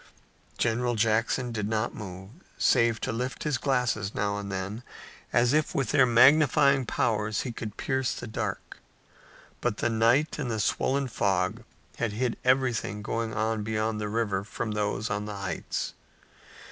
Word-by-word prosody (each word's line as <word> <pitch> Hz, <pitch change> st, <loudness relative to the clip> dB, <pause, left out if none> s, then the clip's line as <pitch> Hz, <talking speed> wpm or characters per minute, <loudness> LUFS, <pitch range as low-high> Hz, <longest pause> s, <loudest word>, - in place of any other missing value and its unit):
General 120 Hz, +1 st, +1 dB
Jackson 115 Hz, +3 st, +1 dB
did 105 Hz, -2 st, -2 dB
not 110 Hz, +1 st, -1 dB
move, 95 Hz, -1 st, -8 dB, 0.3 s
save 115 Hz, -3 st, +3 dB
to -, -, -1 dB
lift 125 Hz, +3 st, -3 dB
his 150 Hz, -5 st, 0 dB
glasses 120 Hz, -7 st, 0 dB
now 100 Hz, 0 st, 0 dB
and 100 Hz, -1 st, -6 dB
then, 95 Hz, +4 st, -4 dB, 0.5 s
as 120 Hz, +2 st, +3 dB
if 155 Hz, 0 st, +1 dB
with 135 Hz, -, 0 dB
their 130 Hz, -2 st, +5 dB
magnifying 135 Hz, +1 st, +5 dB
powers 105 Hz, -1 st, 0 dB
he 125 Hz, -, -4 dB
could 110 Hz, -3 st, -7 dB
pierce 130 Hz, -2 st, 0 dB
the -, -, -6 dB
dark. 110 Hz, -, -5 dB, 0.8 s
But 120 Hz, -3 st, 0 dB
the 120 Hz, -, 0 dB
night 120 Hz, +8 st, +2 dB
and 135 Hz, -5 st, -2 dB
the 110 Hz, -2 st, -2 dB
swollen 135 Hz, +6 st, +1 dB
fog 100 Hz, -1 st, 0 dB, 0.3 s
still 120 Hz, -, -1 dB
hid 115 Hz, +3 st, -1 dB
everything 125 Hz, -5 st, +1 dB
going 115 Hz, +1 st, -2 dB
on 110 Hz, 0 st, 0 dB
beyond 110 Hz, 0 st, -1 dB
the 105 Hz, -, -2 dB
river 105 Hz, -3 st, -1 dB
from 110 Hz, +1 st, -4 dB
those 105 Hz, 0 st, -1 dB
on 105 Hz, 0 st, -2 dB
the 105 Hz, -1 st, -5 dB
heights. 95 Hz, -2 st, -3 dB
115 Hz, 160 wpm, -28 LUFS, 105-125 Hz, 0.8 s, their